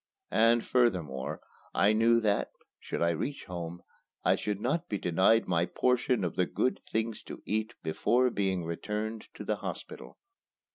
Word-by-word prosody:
And, 115 +1 +4
furthermore, 90 - 0 0.3
I 100 +2 +4
knew 115 +2 +4
that, 105 -2 +1 0.3
should - - -3
I 85 - +3
reach 135 - -3
home, 85 -1 -6 0.4
I - - +5
should 105 -2 -2
not 140 +9 -1
be 105 - -1
denied 95 +6 +3
my 85 -1 +2
portion 125 0 +1
of 90 - -2
the 90 - +2
good 130 - 0
things 110 -1 -1
to - - -9
eat 110 +2 -1
before 125 +10 +2
being 95 -4 0
returned 105 +6 -4
to - - -7
the - - 0
hospital. - - -7
105 Hz, 155 wpm, -30 LUFS, 90-115 Hz, 0.4 s, I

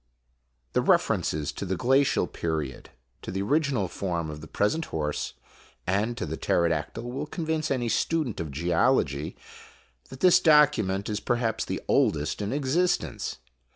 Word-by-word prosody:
The - - +3
references 75 -2 +1
to - - -6
the 95 -1 -1
glacial 135 0 +3
period, 80 -7 -4 0.3
to - - -8
the 95 +2 -2
original 140 - +1
form 85 -4 -3
of 75 0 -8
the 80 - -9
present 155 - 0
horse, 75 -2 -3 0.5
and 105 +6 0
to - - -2
the 80 - -4
pterodactyl 85 +6 0
will 125 +5 -4
convince 160 -2 -2
any 125 -3 0
student 150 0 0
of 85 - -3
IMAGINOTIONS 75 +3 -6
geology 80 - +1 0.7
that 130 - -11
this 180 -1 +7
document 145 - +4
is 105 -1 -2
perhap's 115 0 -1
the - - -3
oldest 75 +6 +1
in 100 - -2
existence. 140 - 0
105 Hz, 150 wpm, -27 LUFS, 85-140 Hz, 0.7 s, this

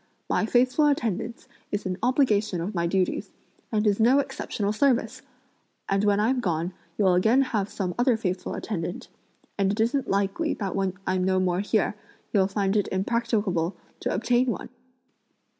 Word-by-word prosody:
My 215 - +1
faithful 255 +5 +3
attendance 230 -4 -1 0.2
is 205 - -2
an 185 0 -3
obligation 220 -7 +2
of 180 +6 -3
my 170 -2 0
duties, 185 +1 0 0.4
and 215 -1 +1
is 205 0 +2
no 240 +5 +5
exceptional 210 -6 -2
service! 260 +1 +1 0.7
and 195 +1 +1
when 205 -1 +3
I'm 245 +5 +2
gone 175 -4 -1 0.2
you'll 190 -3 +4
again 220 +9 +4
have 210 -6 -1
some 185 -3 -3
other 245 -2 +3
faithful 185 -4 -3
attendant, 175 -4 -4 0.5
and 195 -1 +3
it 205 - -4
isn't 240 +5 +1
likely 200 +11 0
that 195 -4 -3
when 195 -2 0
I'm 185 -1 0
no 185 0 +2
more 180 -1 +1
here, 205 +1 +1 0.4
you'll 195 -3 +4
find 195 0 0
it 205 - +2
impracticable 200 -4 0 0.2
to - - -2
obtain 240 +5 +2
one!" 240 +1 -3
205 Hz, 160 wpm, -26 LUFS, 190-235 Hz, 0.7 s, no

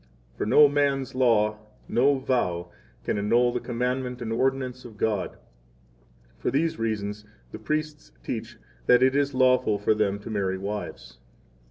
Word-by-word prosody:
For - - -3
no 150 +6 +7
man's 140 -2 0
law, 110 -4 +2 0.3
no 135 +3 +3
vow, 90 -10 -1 0.3
can - - -1
annul 120 +4 +2
the 125 - -1
commandment 125 +1 -2
and 115 -2 -3
ordinance 130 0 -1
of 115 -3 -12
God. 105 -3 -1 1.0
For - - -1
these 150 +2 0
reasons 105 -2 -2
9 110 0 -26 0.2
the - - -8
priests 155 - -3
teach - - -5 0.3
that 125 +1 +6
it 130 +1 +3
is 140 -1 +1
lawful 130 -5 +3
for 105 +2 +2
them 105 -2 0
to 105 +2 -9
marry 95 -3 -1
wives. 100 -11 -6
120 Hz, 155 wpm, -26 LUFS, 105-130 Hz, 1.0 s, no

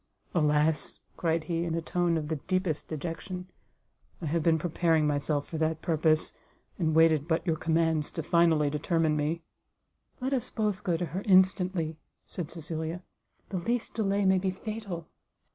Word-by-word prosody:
"Alas!" 150 -1 +2 0.2
said 165 -1 +1
he, 165 +1 -1
in 165 -1 -1
a - - 0
tone 175 0 +1
of 150 -2 -3
the 160 0 -1
deepest 185 0 -1
dejection; 175 +4 -5 0.7
"I 170 - -6
have 165 +2 0
been 160 0 +3
preparing 165 -1 +2
myself 145 0 0
for 160 - -5
that 160 0 0
purpose, 155 -1 +2 0.5
and 160 -3 +1
waited 160 -2 +5
but 165 0 0
your 165 -3 +2
commands 160 -1 +1
to 165 - -3
finally 160 -3 +3
determine 160 +1 +1
me." 155 +3 -1 0.8
"Let 265 +1 -1
us 255 -4 0
both 210 -3 -1
go 175 -3 +1
to 175 - -1
her 175 +5 -4
instantly," 185 -4 +3 0.3
said 170 -4 -5
Cecilia; 165 +1 -4 0.5
"the 195 - -2
least 235 +6 -1
delay 200 -2 +1
may 190 0 +4
be 190 +1 0
fatal." 195 -3 -5
165 Hz, 160 wpm, -29 LUFS, 155-180 Hz, 0.8 s, waited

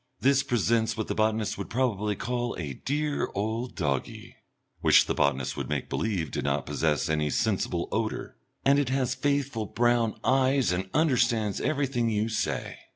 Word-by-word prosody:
This 135 +1 +4
presents 115 -2 +1
what 110 - -3
the - - +1
botanist 110 0 0
would - - -5
probably 105 -5 0
call 120 +2 -2
a 75 -5 -4
"dear 145 - -2
old 110 +5 -2
doggie" 70 -7 -3 0.4
which - - +6
the - - -1
botanist 65 -2 0
would - - -4
make - - -2
believe 95 -9 -1
did - - -3
not 70 +1 0
possess 75 -2 0
any 75 -1 0
sensible 95 -3 0
odour 110 0 -2 0.3
and 140 +1 +5
it 140 -3 0
has 130 -1 0
faithful 140 -6 -1
brown 120 0 +1
eyes 130 -1 +3
and 95 +1 -2
understands 120 - +2
everything 130 -4 0
you 110 +1 0
say. 110 -2 -2
110 Hz, 160 wpm, -27 LUFS, 100-130 Hz, 0.4 s, which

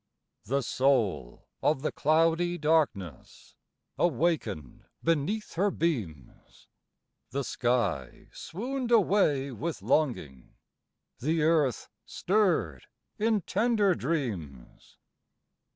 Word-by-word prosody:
The 135 +5 0
soul 110 - 0 0.2
of 150 -2 +1
the 155 - 0
cloudy 165 +3 +2
darkness 150 - -1 0.4
Awakened 145 - -1 0.2
beneath 165 +7 -1
her 195 +5 +1
beams, 110 - -4 0.6
The 140 +3 -2
sky 115 - -1
swooned 250 +7 -5
away 190 - +3
with 155 +7 -5
longing, 80 - -1 0.6
The 155 +5 0
Earth 155 -6 +2 0.2
stirred 170 - 0 0.3
in 215 -1 +2
tender 210 +1 +2
dreams. 105 - -5
150 Hz, 85 wpm, -28 LUFS, 115-175 Hz, 0.6 s, away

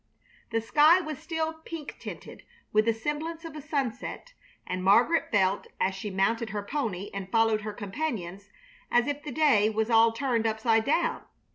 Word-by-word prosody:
The 225 - 0
sky 305 +9 +5
was 310 -5 -5
still 320 -1 -2
pink 320 -3 -8
tinted - - -9 0.3
with 215 0 +4
the 230 - +4
semblance 310 +7 -4
of 325 -2 -8
a 300 - -6
sunset, 285 - -4 0.3
and 185 0 -3
Margaret 235 - +4
felt, 195 -2 +2
as 190 - +1
she 195 +2 -5
mounted 220 +4 0
her 205 0 -4
pony 205 -6 -3
and 195 -1 -5
followed 225 -1 +3
her 215 0 -4
companions, 205 - -5 0.4
as 240 0 +3
if 290 0 -3
the 295 -2 -7
day 255 -8 +4
was 220 +1 -1
all 225 0 +6
turned 230 -2 0
upside 220 0 +1
down. 315 +5 +1
230 Hz, 170 wpm, -28 LUFS, 210-295 Hz, 0.4 s, all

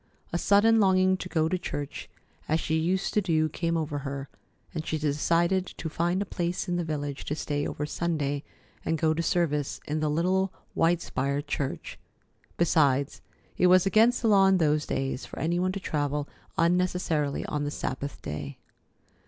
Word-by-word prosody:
A - - +2
sudden 220 +4 +5
longing 190 -2 +4
to 185 - -6
go 160 -3 +2
to 180 +2 -1
church 145 -5 -5 0.4
as 160 +1 +2
she 160 - -1
used 185 +4 0
to 210 - +3
do 160 -4 +2
came 165 +1 -1
over 150 -2 -2
her, 140 0 -5 0.4
and 160 - -3
she 160 - -2
decided 170 +5 +1
to 160 - -4
find 175 +5 0
a - - -10
place 175 0 -2
in 175 - 0
the 175 - 0
village 145 -3 -4
to 150 - -2
stay 145 -2 -2
over 150 - -3
Sunday 150 -3 -1 0.4
and 165 - 0
go 155 0 +2
to 165 - -1
service 150 -5 0
in 150 +1 -2
the 155 0 0
little 185 +5 +1 0.2
white 165 +1 +2
spired 140 +2 -2
church. 145 -2 -4 0.6
Besides, 145 -5 +2 0.4
it 180 - +5
was 185 +1 +6
against 225 +5 +4
the - - +3
law 195 -2 +6
in 190 0 +5
those 150 -3 +2
days 135 0 -2
for - - -11
any 170 +2 0
one 185 +1 +1
to 195 - -4
travel 145 -4 -1 0.3
unnecessarily 170 -4 +1
on 150 -1 -2
the 145 - -1
Sabbath 140 -1 -4
day. 75 -2 -5
160 Hz, 180 wpm, -27 LUFS, 145-180 Hz, 0.6 s, was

